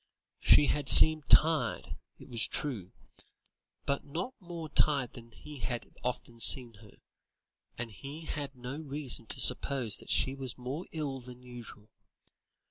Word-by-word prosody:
She 150 - +4
had 145 -1 -1
seemed 155 -1 +9
tired, 160 0 +2 0.2
it - - -16
was 115 -2 0
true, 110 -11 -5 0.9
but 140 0 -3
not 170 - -7
more 170 -4 -9
tired 140 -4 0
than 115 -1 -14
he 145 +5 -14
had 120 +2 -7
often 125 -1 -6
seen 120 0 +4
her, 105 -3 -19 0.8
and 115 -1 -7
he 140 - -11
had 145 -3 -7
no 125 +3 -9
reason 140 -6 -3
to - - -7
suppose 125 -3 -1
that - - -10
she 130 - +2
was 135 -3 -9
more 130 +7 -7
ill 145 -4 -6
than 125 0 -14
usual. 120 -4 -13
135 Hz, 145 wpm, -29 LUFS, 120-150 Hz, 0.9 s, seemed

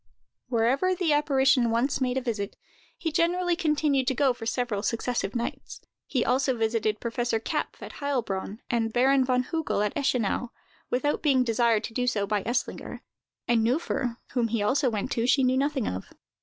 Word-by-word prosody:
Wherever 260 +10 +2
the 340 -4 +1
apparition 270 -4 +3
once 245 +5 0
made 255 0 0
a - - +1
visit, 215 -5 -3 0.4
he 325 - -2
generally 345 +2 +1
continued 300 -6 +1
to 265 - +1
go 270 -1 +3
for 225 -2 -7
several 230 -4 -1
successive 230 -2 -2
nights. 235 0 -4 0.3
He 255 -4 0
also 260 -1 +1
visited 220 -1 0
Professor 235 -1 -1
Kapff - - -3
at - - -7
Heilbronn, 225 -7 -2
and 225 -2 0
Baron 265 +3 +4
von 255 -1 +1
Hugel 320 -10 0
at 210 - -2
Eschenau, 245 -4 0 0.4
without 260 +4 0
being 270 -4 +3
desired 230 -2 +2
to 225 - -6
do 250 +2 -1
so 205 -4 +1
by 205 0 0
Eslinger; 240 +2 -3 0.5
and 235 -2 +3
Neuffer, 245 -1 0
whom 240 -3 +1
he 225 -2 -1
also 260 +5 +2
went 220 +3 -3
to, 235 0 0
she 270 +1 +4
knew 255 0 +3
nothing 275 -2 0
of. 95 +1 -4
250 Hz, 175 wpm, -27 LUFS, 230-275 Hz, 0.5 s, Baron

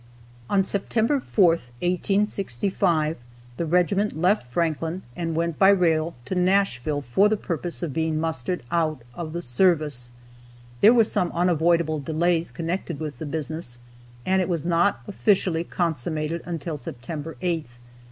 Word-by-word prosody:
On 195 -1 +3
September 220 +7 0
4th, 170 - +2 0.2
1865, 180 - +1 0.4
the 170 - -2
regiment 180 +2 +1
left 180 - +2
Franklin 165 +4 -1
and 165 -2 -3
went 170 -1 -1
by 195 - +7
rail 170 -4 +2
to 130 - -3
Nashville 180 -7 +1
for 190 +12 +3
the 215 - +1
purpose 175 -2 -4
of 155 -5 -3
being 160 0 0
mustered 160 0 -2
out 155 -6 0
of 160 +3 -6
the 170 +2 -4
service. 145 -2 +1 0.7
There 215 - +8
were 230 - +6
some 180 -4 0
unavoidable 170 -2 +2
delays 165 +3 0
connected 170 -2 -4
with 155 -2 -5
the 160 - -5
business, 155 -4 -5 0.5
and 190 0 +2
it 185 - -2
was 170 -3 -1
not 170 -8 +2
officially 170 - +1
consummated 160 -1 -1
until 165 -2 -4
September 145 +4 -6
8th. 170 -3 0
170 Hz, 140 wpm, -24 LUFS, 155-180 Hz, 0.7 s, There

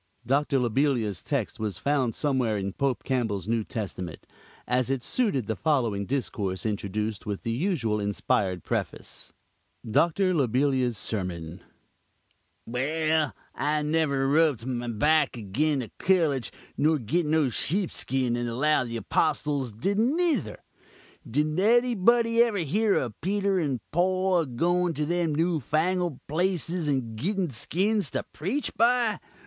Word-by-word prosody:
Doctor 140 +3 +2
Lobelia's 120 - +1
text 135 -8 -2
was 105 -5 -2
found 140 -5 0
somewhere 130 -7 0
in 100 -1 -3
Pope 135 -3 -1
Campbell's 110 -8 -1
New 115 -1 +1
Testament; 95 -6 -6 0.4
as 125 0 0
it 135 -2 -1
suited 200 - 0
the 110 - -2
following 115 -10 0
discourse 105 -8 -2
introduced 105 0 -3
with 100 -2 -3
the 115 - -2
usual 125 - 0
inspired 100 -3 0
preface: - - -4 0.6
DOCTOR 170 - +2
LOBELIA'S 130 -4 +1
SERMON 90 -4 -4 1.0
"Well, 155 +5 0 0.2
I 150 +1 0
never 150 -3 +1
rub'd 145 -5 +2
my 120 -2 -3
back 145 +5 +2
agin 130 +7 0
a 110 - -9
collige, 160 -9 +2 0.3
nor 155 +2 +3
git 150 +7 -1
no 155 -3 +2
sheepskin, 135 - 0
and 120 0 -2
allow 135 +4 +2
the 115 -1 -4
Apostuls 140 0 0
didn't 205 - 0
nither. 350 -3 0 0.7
Did 150 +6 0
anybody 235 +1 +4
ever 235 -3 +2
hear 200 +6 +1
of 120 -5 -2
Peter 195 +2 +1
and 140 -7 -1
Poll 185 +1 +2
a 160 - -1
goin' 175 +7 +1
to 150 - -1
them 170 -1 0
new 165 +1 +1
fangled 165 +3 0
places 175 0 0
and 130 -6 -1
gitten 180 - -1
skins 190 - 0
to - - -2
preach 215 - -2
by? 235 -2 +3
140 Hz, 135 wpm, -27 LUFS, 115-175 Hz, 1.0 s, anybody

